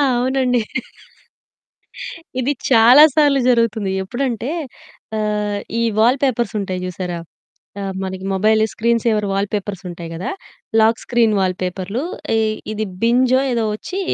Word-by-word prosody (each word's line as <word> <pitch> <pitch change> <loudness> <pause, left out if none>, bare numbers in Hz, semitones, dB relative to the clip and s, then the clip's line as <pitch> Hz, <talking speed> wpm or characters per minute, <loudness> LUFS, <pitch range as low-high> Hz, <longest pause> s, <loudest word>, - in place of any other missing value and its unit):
అవునండి. 250 -1 +1 1.8
ఇది 255 +3 +1 0.2
చాలా 245 +5 +8
సార్లు 290 -3 +4
జరుగుతుంది. 225 -4 +1
ఎప్పుడంటే 245 +3 -2 0.7
ఆహ్, 210 -1 -1 0.2
ఈ - - +1 0.2
వాల్‌పేపర్స్ 245 0 +2
ఉంటాయి 185 -2 -3
జూశారా? 180 -1 -4 0.6
ఆ! - - -4 0.2
మనకి 190 0 -5
మొబైల్ 215 +3 +3
స్క్రీన్ 230 0 +1
సేవర్ 215 -3 +1
వాల్‌పేపర్స్ 200 -1 -2
ఉంటాయి 170 -1 -7
గదా! 175 - -4 0.5
Lock 225 +1 +4
screen 230 -3 +2
వాల్‌పేపర్‌లు. 185 +5 -2 0.3
ఈ - - +3 0.3
ఇది 215 0 -2 0.2
బింజో 255 +2 +3
ఏదో 230 -2 0
ఒచ్చి 370 - -5
220 Hz, 115 wpm, -19 LUFS, 195-245 Hz, 1.8 s, చాలా